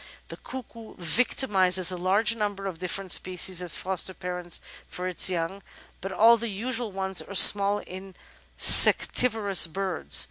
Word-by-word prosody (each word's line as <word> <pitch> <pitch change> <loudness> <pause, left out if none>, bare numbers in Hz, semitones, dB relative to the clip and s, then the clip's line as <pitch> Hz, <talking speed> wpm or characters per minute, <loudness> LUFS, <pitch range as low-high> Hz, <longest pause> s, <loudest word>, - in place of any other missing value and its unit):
The - - -10
Cuckoo 230 -3 -12
victimises 185 -2 0
a - - -6
large 195 +6 -1
number 205 -3 -5
of 185 -4 -7
different 185 +1 -6
species 185 0 0
as 175 -3 0
foster 185 0 -2
parents 180 -1 -6 0.3
for 180 +1 -7
its 185 0 +4
young, 180 +2 -5 0.4
but 195 - -7
all 230 +4 +3
the 230 0 -6
usual 230 +2 -5
ones 190 -1 -3
are 200 - -11
small 200 +1 +5
in 190 -1 -12 0.4
sectivorous 210 -8 +4
birds. 175 - -1
190 Hz, 145 wpm, -24 LUFS, 180-210 Hz, 0.4 s, small